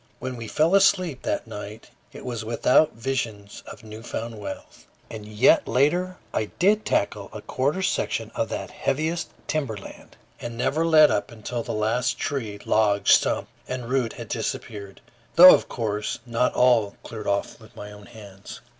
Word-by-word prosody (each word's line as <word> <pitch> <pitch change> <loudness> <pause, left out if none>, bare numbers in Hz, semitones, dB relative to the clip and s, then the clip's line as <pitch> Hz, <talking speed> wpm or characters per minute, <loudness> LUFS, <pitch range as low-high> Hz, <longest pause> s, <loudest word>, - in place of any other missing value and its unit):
When 130 0 -5
we 115 -2 -7
fell 155 - +1
asleep 185 -7 +3
that - - -2
night, 105 0 -9 0.2
it - - -11
was 120 -3 -4
without 125 +6 +3
visions 115 -4 -4
of - - -11
new 110 0 -10
found 115 -1 -6
wealth. 100 -2 -9 0.2
And 110 -2 -8
yet 110 +4 +4
later 175 +9 +1 0.2
I 110 - 0
did 210 +4 +3
tackle 100 0 -1
a 105 - -9
quarter 145 +9 -1
section 185 - -1
of - - -2
that - - -5
heaviest 160 +4 -2 0.2
timber 140 -9 -2
land, 100 - -13 0.2
and 120 -1 -7
never 155 +7 0
let 155 -2 +6
up - - -1
until 115 +1 -5
the - - -5
last 115 +4 0
tree, 110 -8 -3
log, 105 -2 +2
stump, - - +4 0.2
and 125 -2 -5
root 125 -3 0
had - - -9
disappeared, 100 -2 -5 0.3
though 180 +3 +11
of - - +1
course, 105 -3 -3
not 120 +1 0
all 115 -5 +3
cleared 110 -2 -8
off 100 0 -1
by - - -15
my 105 0 -9
own 105 0 -13
hands. 100 -4 -12
115 Hz, 170 wpm, -24 LUFS, 105-135 Hz, 0.3 s, though